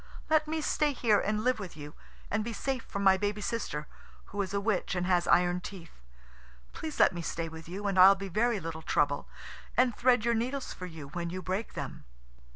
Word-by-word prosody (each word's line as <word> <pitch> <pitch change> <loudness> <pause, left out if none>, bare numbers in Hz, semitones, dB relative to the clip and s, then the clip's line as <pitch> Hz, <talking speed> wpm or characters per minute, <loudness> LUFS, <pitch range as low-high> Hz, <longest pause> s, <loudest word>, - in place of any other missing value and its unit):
Let 310 -1 +4
me 315 0 -1
stay 300 -1 +1
here 225 -5 +3
and 210 +1 -1
live 250 -1 +2
with 185 -6 -7
you, 150 0 -8 0.4
and 215 +1 +1
be 230 +1 -4
safe 260 +3 -2
from 200 - -4
my 190 -1 +6
baby 205 +1 -1
sister, 200 -9 -3 0.4
who 205 - -2
is 195 - -3
a 200 - 0
witch 200 -3 0
and 180 0 0
has 180 -1 +2
iron 180 0 +3
teeth. 175 - -10 0.7
Please 315 -2 -6
let - - +6
me 175 - -4
stay 165 0 -3
with 160 0 -10
you, 195 +4 -5
and 195 -2 +1
I'll 190 +2 +9
be 195 0 -6
very 215 +4 +1
little 165 -2 -6
trouble, 145 -2 +1 0.5
and 250 -3 +4
thread 245 -2 +3
your 235 - +3
needles 250 +4 -2
for 180 - -7
you 160 -5 -9
when 170 +3 -4
you 185 +1 -5
break 190 +5 -3
them." - - -6
200 Hz, 215 wpm, -30 LUFS, 175-230 Hz, 0.7 s, I'll